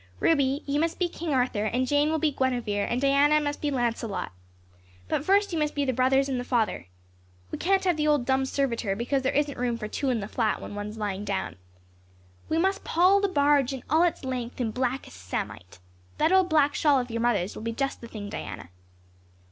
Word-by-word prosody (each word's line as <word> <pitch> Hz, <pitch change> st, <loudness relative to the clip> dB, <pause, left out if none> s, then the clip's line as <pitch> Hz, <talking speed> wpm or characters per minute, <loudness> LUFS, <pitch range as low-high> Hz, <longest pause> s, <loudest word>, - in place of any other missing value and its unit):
"Ruby, 280 Hz, -2 st, +2 dB
you 285 Hz, +1 st, 0 dB
must 330 Hz, +1 st, 0 dB
be 360 Hz, -, +1 dB
King 335 Hz, -1 st, -5 dB
Arthur 250 Hz, -5 st, +1 dB
and 250 Hz, +4 st, 0 dB
Jane 290 Hz, +3 st, +2 dB
will 320 Hz, -, +1 dB
be 315 Hz, -1 st, +1 dB
Guinevere 240 Hz, -7 st, -1 dB
and 240 Hz, -, 0 dB
Diana 280 Hz, +2 st, +4 dB
must 290 Hz, -1 st, -3 dB
be 295 Hz, -, 0 dB
Lancelot. 235 Hz, -5 st, -2 dB, 0.8 s
But 260 Hz, -, -1 dB
first 395 Hz, +2 st, +2 dB
you 325 Hz, -, 0 dB
must 300 Hz, -1 st, -1 dB
be 285 Hz, -1 st, 0 dB
the 260 Hz, -, 0 dB
brothers 265 Hz, +2 st, +3 dB
and 260 Hz, -2 st, -1 dB
the -, -, -3 dB
father. 230 Hz, -, -1 dB, 0.6 s
We -, -, -4 dB
can't 390 Hz, +2 st, +2 dB
have 360 Hz, -4 st, +1 dB
the 300 Hz, 0 st, +1 dB
old 295 Hz, -5 st, +2 dB
dumb 265 Hz, 0 st, +1 dB
servitor 235 Hz, -8 st, -1 dB
because 250 Hz, +5 st, -1 dB
there 260 Hz, -, 0 dB
isn't 290 Hz, -2 st, -1 dB
room 245 Hz, -1 st, 0 dB
for 215 Hz, -2 st, -5 dB
two 275 Hz, +5 st, -2 dB
in 245 Hz, -3 st, +1 dB
the 200 Hz, -, -5 dB
flat 220 Hz, -1 st, 0 dB
when -, -, -8 dB
one 205 Hz, 0 st, -4 dB
is 215 Hz, +1 st, -8 dB
lying 205 Hz, -2 st, -3 dB
down. 195 Hz, -2 st, -3 dB, 0.9 s
We 320 Hz, -, +1 dB
must 385 Hz, +3 st, +1 dB
pall 370 Hz, +4 st, +4 dB
the 400 Hz, -, +2 dB
barge 285 Hz, -4 st, +2 dB, 0.2 s
all 315 Hz, +2 st, +4 dB
its 345 Hz, -5 st, +1 dB
length 250 Hz, -2 st, -4 dB
in 230 Hz, -3 st, -1 dB
blackest 250 Hz, -, -3 dB
samite. 90 Hz, +2 st, -5 dB, 0.4 s
That 315 Hz, +3 st, +2 dB
old 375 Hz, -1 st, +4 dB
black 295 Hz, -2 st, +3 dB
shawl 290 Hz, -3 st, +3 dB
of 245 Hz, -1 st, -4 dB
your 230 Hz, 0 st, -2 dB
mother's 210 Hz, -6 st, 0 dB
will -, -, -7 dB
be 230 Hz, +1 st, -3 dB
just 275 Hz, +4 st, -3 dB
the 235 Hz, -, -8 dB
thing, 210 Hz, -3 st, -7 dB
Diana." 85 Hz, -, -7 dB
265 Hz, 220 wpm, -26 LUFS, 230-300 Hz, 0.9 s, Diana